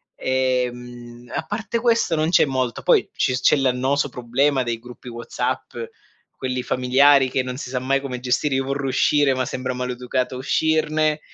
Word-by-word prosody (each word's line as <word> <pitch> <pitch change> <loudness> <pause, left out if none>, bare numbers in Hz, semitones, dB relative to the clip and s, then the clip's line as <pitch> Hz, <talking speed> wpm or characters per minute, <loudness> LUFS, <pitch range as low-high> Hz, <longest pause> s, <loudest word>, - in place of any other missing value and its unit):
Ehm, 125 -2 -2
a - - -1
parte 225 +6 -3
questo 230 -8 +2
non 155 +1 +1
c'è 170 - +5
molto, 130 -4 -2
poi - - +3
ci 130 - 0
c'è 130 - +4
l'annoso 135 +2 +1
problema 130 +2 0
dei 120 -2 -3
gruppi 125 +1 -11
WhatsApp, 120 0 -4 0.6
quelli 130 -1 -3
familiari, 130 +2 +4
che 130 0 0
non 125 0 -5
si 130 - -6
sa 130 0 -2
mai 135 +2 +1
come 135 -2 -5
gestire. 130 +3 0
Io 135 - +1
vorrò 140 0 -2
uscire, 140 +1 +3
ma 130 0 -1
sembra 130 +1 -3
maleducato 125 0 -3
uscirne. 155 +2 +1
130 Hz, 165 wpm, -22 LUFS, 125-140 Hz, 0.6 s, c'è